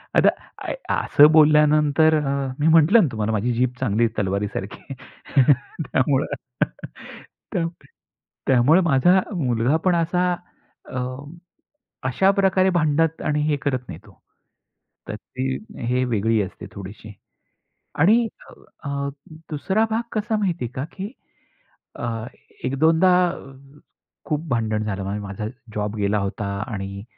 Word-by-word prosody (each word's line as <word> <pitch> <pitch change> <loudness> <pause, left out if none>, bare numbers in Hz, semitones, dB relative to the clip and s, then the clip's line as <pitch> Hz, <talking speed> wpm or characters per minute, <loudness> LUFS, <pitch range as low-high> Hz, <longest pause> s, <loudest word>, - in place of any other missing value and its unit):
आता - - +6 0.3
अ, - - -3 0.2
असं 145 - +6
बोलल्यानंतर 150 0 +5
अ, 140 -1 -1
मी 150 - +2
म्हटलं 165 +7 +6
ना 160 - +2
तुम्हाला 110 0 -2
माझी 110 +3 0
जीभ 125 +1 +1
चांगली 115 -2 +1
आहे, 115 -1 -1
तलवारीसारखी, 100 +5 -3 0.9
त्यामुळं 135 +1 +1 2.2
त्यामुळे 135 +8 +5
माझा 170 +4 +4 0.2
मुलगा 125 -1 +1
पण 180 -2 +4
असा 180 +2 +1 0.6
अ, 125 - -4 1.1
अशाप्रकारे 190 +5 +3
भांडत 160 0 +1
आणि 150 0 +1
हे 150 - +2
करत 135 -3 0
नाही, - - -8
तो. - - -19 0.9
तर - - -4
ती 130 +1 -4 0.3
हे 125 +1 +1
वेगळी 110 -1 +1
असते 95 -2 -6
थोडीशी. 105 +2 -10 0.9
आणि 220 +9 +5 0.6
अ, 140 0 -2 0.4
दुसरा 190 +9 0
भाग 225 +2 0
कसा 220 0 -1
माहितीये 175 - -1
का, 130 - -3
की 200 +5 -6 0.9
अ, 115 -2 -3 0.4
1-2दा 160 +7 +3 1.1
खूप 155 +2 -2
भांडण 110 -3 0
झालं. 100 0 -3
माझा 100 +2 -5 0.3
जॉब 105 0 -2
गेला 100 0 +1
होता 100 +1 -3 0.2
आणि 100 -3 -6
135 Hz, 115 wpm, -22 LUFS, 110-160 Hz, 2.2 s, आता